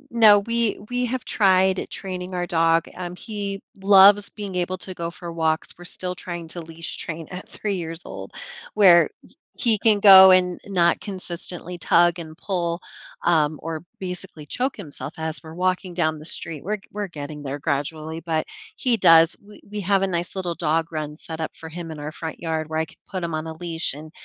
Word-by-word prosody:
No, 215 -3 +8
we 230 +1 0
we 250 0 0
have 255 0 -3
tried 190 -2 +3
training 185 -1 -6
our 175 - -1
dog, 165 0 +2
um, 180 -1 -5
he 200 -1 -5 0.2
loves 200 +1 +7
being 205 -3 -7
able 180 +1 -1
to 185 - -7
go 170 -2 -4
for 170 0 -8
walks, 160 -1 0
we're 175 - -12
still 180 0 -4
trying 175 -2 -6
to 175 - -6
leash 165 0 -8
train 160 -1 -6
at 180 +1 -8
3 205 -2 -3
years 165 0 -6
old, 95 0 -8 0.4
where 185 -5 +7 0.5
h - - -6
he 230 -3 +3
can 210 -1 +4
go 190 -2 +10
and 180 -1 +3
not 175 -4 +3
consistently 180 -2 -5
tug 175 +1 +4
and 160 -1 -8
pull, 170 -3 -2 0.5
um, 155 -3 +2
or 160 0 -4 0.2
basically 180 -4 -6
choke 260 - -1
himself 150 -5 -7
as 160 0 -4
we're 160 0 -10
walking 185 0 -1
down 160 -3 0
the 155 - -11
street, 160 -3 -5
we're 210 +5 -1
we're 205 0 -3
getting 150 -3 -7
there 140 +1 -4
gradually, 155 +2 -3
but 160 -2 -1 0.3
he 245 -3 +1
does 165 -2 +6
we 205 0 -15
we 210 - -4
have 195 +1 +2
a - - +2
nice 175 0 -2
little 180 -3 -2
dog 165 0 0
run 155 -2 -4
set 160 0 -6
up 160 - -4
for 160 - -9
him 170 0 -7
in 155 - -7
our 150 +1 -5
front 160 0 -7
yard 160 -2 -2
where 160 0 -1
I 160 - 0
could - - -19
put 185 -3 -4
him 165 - -3
on 155 +1 -4
a 160 - -5
leash, 165 -2 -2
and 155 +2 -10
175 Hz, 205 wpm, -23 LUFS, 160-190 Hz, 0.5 s, go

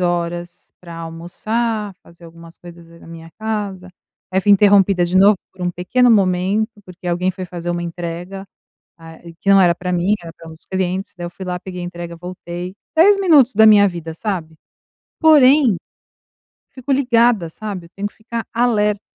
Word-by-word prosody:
horas 175 0 -3
pra 170 -2 -11
almoçar, 205 +7 -3
fazer 170 0 -18
algumas 165 0 -14
coisas 170 -1 -14
na - - -15
minha 165 0 -11
casa, 205 -4 -4 0.4
aí 190 - +2
fui 205 +2 +4
interrompida 200 -2 +4
de 175 +2 -1
novo 200 +2 +6 0.2
por 190 - -10
um 180 - 0
pequeno 240 +9 +2
momento, 195 +1 +2
porque 180 0 -12
alguém 180 +2 0
foi 185 0 -7
fazer 175 -1 -6
uma 175 0 -3
entrega, 175 +3 -6 0.5
ah, 165 0 -13
e 170 -1 -11
que 195 +4 -1
não 195 0 +7
era 175 -2 +4
pra 180 +1 -4
mim, 180 +4 +1
era 165 -1 -9
pra 165 - -14
um - - -10
dos 160 - -20
clientes, 190 +1 -3
daí 175 -1 -6
eu - - -7
fui 180 +2 -10
lá, 180 -1 -4
peguei 180 -1 -8
a - - -4
entrega, 175 -1 -7
voltei, 180 +1 -8 0.2
10 395 +5 +6
minutos 295 - +4
da 220 +2 +6
minha 205 -2 +7
vida, 170 -3 -7
sabe, 165 -4 -5 0.6
porém 285 - +5 1.0
fico 260 +1 -6
ligada, 235 -8 +2
sabe, 190 -1 -7
eu - - -29
tenho 200 +1 -3
que - - -16
ficar 230 +1 -6
alerta. 210 -4 +1
185 Hz, 185 wpm, -18 LUFS, 175-210 Hz, 1.0 s, não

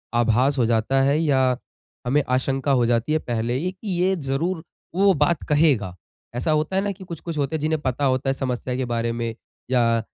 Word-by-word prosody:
आभास 120 +4 +3
हो 125 - +3
जाता 115 +4 +2
है, 140 +3 +3
या 130 -5 +2 0.5
हमें 145 +4 +3
आशंका 135 +2 0
हो 125 -3 +3
जाती 120 +5 +1
है 155 - +2
पहले 120 -3 -2
ही 180 +7 -2
कि, 190 +3 -12
"ये 190 +1 +3
ज़रूर 160 +3 -2 0.3
वो 195 +1 +5
बात 150 +1 +1
कहेगा।" 140 - +2 0.4
ऐसा 125 +6 0
होता 155 +4 0
है 190 - +3
ना 205 - -1
कि 190 -1 -10
कुछ-कुछ 170 -2 -6
होते 145 +1 -1
हैं, - - -1
जिन्हें 155 0 0
पता 130 +1 -1
होता 130 0 +1
है - - +2
समस्या 130 -1 -3
के 130 0 -1
बारे 115 -1 -1
में, 115 -1 -3 0.4
या 115 -2 +3
135 Hz, 205 wpm, -23 LUFS, 120-155 Hz, 0.5 s, वो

